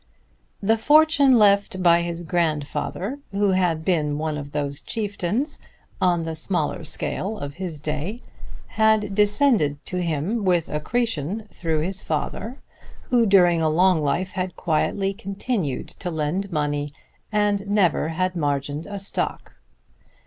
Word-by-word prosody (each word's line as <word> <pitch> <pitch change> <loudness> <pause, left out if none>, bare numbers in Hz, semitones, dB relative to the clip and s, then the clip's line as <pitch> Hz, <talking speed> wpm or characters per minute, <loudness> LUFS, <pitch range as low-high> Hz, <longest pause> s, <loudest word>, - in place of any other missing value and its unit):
The 225 +3 +3
fortune 290 -1 +5
left 200 -2 +3
by 170 -1 +5
his 170 0 -4
grandfather, 170 - -2
who 200 0 +2
had 175 -4 +1
been 150 -5 +1
one 155 0 -2
of 145 -1 -6
those 145 -1 -2
chieftains, 210 - -2 0.4
on 175 -2 +2
the 165 0 -3
smaller 160 0 -1
scale 195 +6 -3
of 145 -4 -6
his 170 -5 -4
day, 155 +9 -3 0.5
had 220 -2 +2
descended 210 - +3
to 180 0 -2
him 170 +7 -1
with 180 -4 +1
accretion 210 - -2
through 160 -3 -1
his 190 +4 -2
father, 205 - -3 0.5
who 235 -2 +4
during 175 -4 +5
a 160 - +2
long 180 +1 +3
life 150 +6 0
had 185 -1 -3
quietly 195 +4 0
continued 195 - -3
to 180 - -3
lend 170 +5 -2
money 145 -2 -1 0.4
and 205 -1 +1
never 190 -7 +2
had 185 +3 -1
margined 145 -1 -2
a 205 -1 -5
stock. 195 0 -3
180 Hz, 135 wpm, -23 LUFS, 155-205 Hz, 0.5 s, fortune